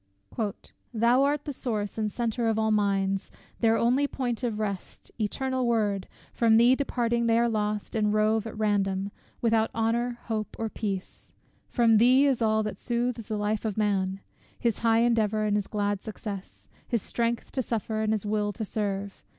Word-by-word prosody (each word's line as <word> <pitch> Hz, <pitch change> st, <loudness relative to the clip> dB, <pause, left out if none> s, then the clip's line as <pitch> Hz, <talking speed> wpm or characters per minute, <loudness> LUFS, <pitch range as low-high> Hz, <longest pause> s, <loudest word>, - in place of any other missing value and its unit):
Thou 235 Hz, +4 st, +4 dB
art 285 Hz, +1 st, +1 dB
the 290 Hz, -, -3 dB
source 215 Hz, -6 st, -3 dB
and 215 Hz, -1 st, -1 dB
center 235 Hz, 0 st, -1 dB
of 220 Hz, -1 st, +1 dB
all 220 Hz, 0 st, +2 dB
minds, 195 Hz, -2 st, +1 dB, 0.3 s
Their 225 Hz, -1 st, +3 dB
only 255 Hz, +5 st, +3 dB
point 245 Hz, -4 st, -3 dB
of 235 Hz, -4 st, -1 dB
rest, 200 Hz, -3 st, -5 dB
ETERNAL 260 Hz, +4 st, -1 dB
WORD 210 Hz, -5 st, +1 dB, 0.3 s
From 225 Hz, -2 st, +4 dB
thee 240 Hz, +2 st, +6 dB
departing, 235 Hz, -3 st, 0 dB
they 230 Hz, 0 st, +4 dB
are 235 Hz, 0 st, +3 dB
lost, 210 Hz, -2 st, -2 dB
and 210 Hz, -1 st, +2 dB
rove 215 Hz, +1 st, +2 dB
At 220 Hz, -, -8 dB
random, 200 Hz, -2 st, 0 dB, 0.3 s
without 225 Hz, -1 st, +2 dB
honour, 235 Hz, +2 st, 0 dB
hope, 215 Hz, -2 st, -3 dB
or 225 Hz, -1 st, -2 dB
peace: 195 Hz, -4 st, -5 dB, 0.4 s
From 230 Hz, -3 st, +4 dB
thee 255 Hz, +5 st, +6 dB
is 265 Hz, -4 st, +2 dB
all 220 Hz, -1 st, +2 dB
that 210 Hz, -2 st, -5 dB
soothes 240 Hz, -2 st, -2 dB
the 215 Hz, -, -2 dB
life 210 Hz, +1 st, -1 dB
of 220 Hz, -3 st, -2 dB
man; 195 Hz, -2 st, 0 dB, 0.4 s
His 235 Hz, -3 st, 0 dB
high 230 Hz, 0 st, +3 dB
endeavour, 220 Hz, -3 st, +2 dB
and 210 Hz, -1 st, +1 dB
his 205 Hz, -2 st, -1 dB
glad 205 Hz, -1 st, -1 dB
success; 205 Hz, -3 st, -7 dB, 0.2 s
His 235 Hz, -5 st, -1 dB
strength 235 Hz, 0 st, -2 dB
to 260 Hz, -, -1 dB
suffer, 220 Hz, -2 st, -2 dB
and 215 Hz, 0 st, +1 dB
his 215 Hz, -2 st, -1 dB
will 210 Hz, 0 st, 0 dB
to 220 Hz, +2 st, -4 dB
serve. 200 Hz, -1 st, -3 dB
220 Hz, 175 wpm, -27 LUFS, 210-235 Hz, 0.4 s, thee